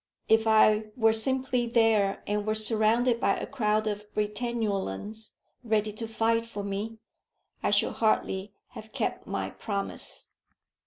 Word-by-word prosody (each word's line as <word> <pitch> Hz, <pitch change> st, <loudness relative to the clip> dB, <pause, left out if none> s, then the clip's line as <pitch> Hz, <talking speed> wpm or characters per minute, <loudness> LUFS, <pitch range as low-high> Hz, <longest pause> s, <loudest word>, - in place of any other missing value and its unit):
If 225 Hz, 0 st, +4 dB
I 215 Hz, 0 st, +5 dB
were 225 Hz, -2 st, +4 dB
simply 255 Hz, +1 st, +1 dB
there, 225 Hz, -4 st, +2 dB
and 210 Hz, 0 st, -1 dB
were 215 Hz, -, +1 dB
surrounded 225 Hz, +2 st, +2 dB
by -, -, +2 dB
a -, -, -4 dB
crowd 215 Hz, -5 st, 0 dB
of 210 Hz, 0 st, -4 dB
Britannulans 210 Hz, -, -2 dB, 0.3 s
ready 215 Hz, -2 st, 0 dB
to 225 Hz, +2 st, -5 dB
fight 230 Hz, +1 st, +1 dB
for 205 Hz, -3 st, -6 dB
me, 200 Hz, +3 st, -4 dB, 0.6 s
I -, -, +1 dB
should -, -, +2 dB
hardly 205 Hz, -3 st, 0 dB, 0.2 s
have 220 Hz, 0 st, -11 dB
kept -, -, -2 dB
my -, -, -3 dB
promise. 200 Hz, -2 st, -5 dB
220 Hz, 140 wpm, -28 LUFS, 210-230 Hz, 0.6 s, I